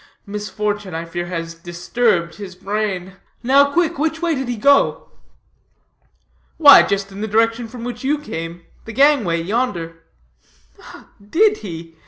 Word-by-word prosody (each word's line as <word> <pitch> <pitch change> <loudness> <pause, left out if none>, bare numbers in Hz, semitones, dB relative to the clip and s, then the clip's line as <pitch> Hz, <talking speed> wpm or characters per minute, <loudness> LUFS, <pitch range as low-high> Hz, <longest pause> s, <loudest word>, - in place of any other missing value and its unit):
Misfortune, 205 -2 -4
I 165 +1 -4
fear, 175 +1 -5
has 165 -2 -5
disturbed 175 +2 -1
his 195 -3 -9
brain. 195 -2 -3 0.3
Now 280 +3 +4
quick, 340 -1 0
which 320 +2 -1
way 340 -1 0
did 265 -3 -3
he 245 -1 -3
go?" 280 +6 +2 1.5
"Why 285 -3 +9
just 200 0 -2
in 195 +1 -8
the 220 - -2
direction 225 +2 +1
from 235 +1 -10
which 245 0 -6
you 290 +3 +1
came, 170 - -7 0.2
the 225 - -8
gangway 255 - +3
yonder." 170 -6 -2 1.2
"Did 415 - +2
he? 165 -3 -9
210 Hz, 140 wpm, -19 LUFS, 175-265 Hz, 1.5 s, Why